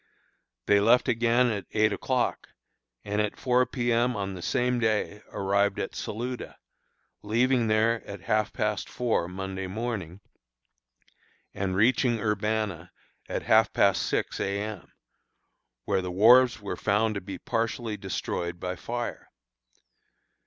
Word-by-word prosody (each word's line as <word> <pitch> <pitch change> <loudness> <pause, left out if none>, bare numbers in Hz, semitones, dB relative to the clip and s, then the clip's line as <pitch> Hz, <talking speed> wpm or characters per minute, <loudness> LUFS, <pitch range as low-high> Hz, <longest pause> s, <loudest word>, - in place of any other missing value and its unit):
They 100 - +4
left 115 +4 +4
again 120 +1 +3
at 100 -3 -4
eight 110 -1 +3
o'clock, 130 -2 -1 0.6
and 105 +1 0
at 105 -1 -2
four 125 0 +2
P. 120 -2 -1
M. 120 +2 +2
on 100 -1 -3
the 90 - -8
same 125 +6 0
day 110 -2 0
arrived 100 +1 +1
at - - -3
Saluda, 120 +3 -5 0.6
leaving 120 +3 +2
there 110 +1 +2
at 100 -2 -8
half 110 +2 0
past 105 -2 -2
four 115 -8 0
Monday 95 +1 -5
morning, 100 -4 -4 1.3
and 95 -1 -2
reaching 120 +3 +3
Urbanna 105 -4 -1 0.4
at - - -3
half 110 0 +4
past 100 -1 +3
six - - -2
A. 100 0 -1
M., 105 +1 -6 0.9
where 95 - +1
the 90 - -4
wharves 120 +7 +6
were 100 -1 -4
found 110 +2 +1
to 100 - -4
be 95 +1 -7
partially 115 -1 -2
destroyed 90 -3 -4
by 90 0 -3
fire. 120 +7 -5
105 Hz, 135 wpm, -27 LUFS, 100-120 Hz, 1.3 s, wharves